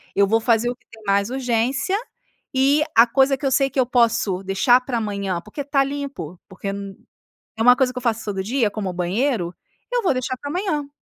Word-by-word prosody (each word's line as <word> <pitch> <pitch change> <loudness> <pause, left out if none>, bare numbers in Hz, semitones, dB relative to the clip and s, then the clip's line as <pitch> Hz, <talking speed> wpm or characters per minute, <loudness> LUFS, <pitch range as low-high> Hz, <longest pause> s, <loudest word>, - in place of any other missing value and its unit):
eu 200 0 +4
vou 225 +3 +3
fazer 230 +1 +2
o 245 - -3
que - - -37
tem 225 - -14
mais 200 +1 +1
urgência. 265 - 0 0.6
E 280 +3 +4
a 230 - +8
coisa 270 +3 +2
que 280 - -6
eu 270 - +1
sei 275 +1 +3
que 270 - -3
eu 255 - +4
posso 230 -6 +1
deixar 195 +6 +4
pra 250 -1 -3
amanhã, 200 -4 -3
porque 215 - -7
tá 275 0 +2
limpo, 270 - -6
porque 190 +1 -6
é 195 -1 -9 0.4
uma 245 +1 +7
coisa 255 -2 +1
que 255 - -5
eu - - -8
faço 230 -2 -1
todo 195 -2 -3
dia, 230 +1 0
como 205 -2 -4
o - - -5
banheiro, 180 +1 -1 0.4
eu - - +1
vou 365 - +2
deixar 255 0 -2
pra 285 - -6
amanhã. 315 -5 -2
240 Hz, 220 wpm, -22 LUFS, 200-270 Hz, 0.6 s, a